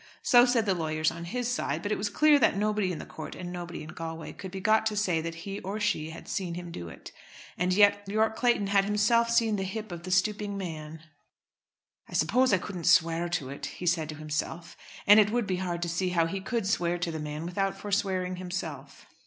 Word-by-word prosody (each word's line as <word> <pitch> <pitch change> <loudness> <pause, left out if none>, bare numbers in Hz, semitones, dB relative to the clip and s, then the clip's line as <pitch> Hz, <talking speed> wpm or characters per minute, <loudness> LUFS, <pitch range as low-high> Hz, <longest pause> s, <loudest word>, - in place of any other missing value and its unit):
So 245 0 +7
said 240 -3 +2
the 195 - +2
lawyers 155 -2 0
on 170 0 -7
his 245 +6 -2
side, 165 -10 -2
but 205 - -2
it - - +1
was 205 +1 -1
clear 300 +7 +5
that 225 - +3
nobody 210 -2 +1
in 170 - -4
the - - -7
court 155 - -8
and 180 0 -6
nobody 175 -2 -6
in 155 - -10
Galway 165 0 -6
could 190 - -8
be 190 +1 -6
got 215 +3 +3
to 215 - -2
say 180 -6 +1
that 165 0 -5
he 200 0 -4
or 200 +3 -4
she 185 -7 0
had 165 +1 -10
seen 180 -3 -3
him 175 -1 -7
do 85 - -7
it. - - -11 0.4
And 180 +1 0
yet 205 +1 +5
Yorke 220 +2 +1
Clayton 240 -4 +2
had 195 0 +3
himself 210 +3 +3
seen 230 -2 +2
the 195 - -2
hip 210 +2 -5
of 170 -1 -6
the 180 - -7
stooping 205 +2 +1
man. 160 -4 -6 1.1
"I - - -12
suppose 255 0 +3
I 200 - +5
couldn't 180 -1 -6
swear 170 0 +4
to 155 -6 -2
it," 140 - -6
he 180 - -8
said 165 -3 +1
to 155 - -5
himself; 155 +2 -4 0.3
and 205 +1 +8
it 210 -1 +5
would 235 0 0
be 185 -2 -1
hard 175 -2 -2
to 170 - -2
see 180 +2 0
how 170 -2 +2
he 190 +4 -3
could 230 +1 -2
swear 175 -3 +1
to 175 -1 -2
the 160 - -4
man 150 +1 -5
without 195 +2 -1
forswearing 190 -3 -1
himself. 165 -7 -6
185 Hz, 235 wpm, -28 LUFS, 165-210 Hz, 1.1 s, and